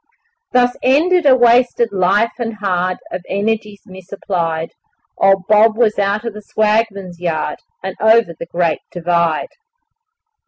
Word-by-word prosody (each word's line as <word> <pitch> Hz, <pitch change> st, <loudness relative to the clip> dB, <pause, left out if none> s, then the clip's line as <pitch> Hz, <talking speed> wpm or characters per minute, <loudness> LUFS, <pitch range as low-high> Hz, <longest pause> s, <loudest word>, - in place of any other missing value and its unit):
Thus 245 Hz, 0 st, +2 dB
ended 330 Hz, +6 st, +3 dB
a 260 Hz, -, +7 dB
wasted 240 Hz, -1 st, +3 dB
life 195 Hz, +5 st, +2 dB
and 230 Hz, -2 st, -3 dB
hard, 185 Hz, -3 st, -1 dB
Of 180 Hz, -, -5 dB
energies 210 Hz, 0 st, -2 dB
misapplied 175 Hz, -3 st, -4 dB, 0.5 s
Old 195 Hz, -1 st, +3 dB
Bob 215 Hz, +1 st, +4 dB
was 225 Hz, -4 st, +1 dB
out 200 Hz, +3 st, 0 dB
of 230 Hz, -, -4 dB
the 210 Hz, -, -9 dB
'swagman's 210 Hz, -4 st, -1 dB
yard' 160 Hz, -3 st, -3 dB, 0.2 s
And 190 Hz, 0 st, -5 dB
over 220 Hz, -4 st, +4 dB
the 165 Hz, +1 st, -9 dB
Great 170 Hz, -2 st, -1 dB
Divide. 170 Hz, -2 st, 0 dB
205 Hz, 130 wpm, -17 LUFS, 180-230 Hz, 0.5 s, a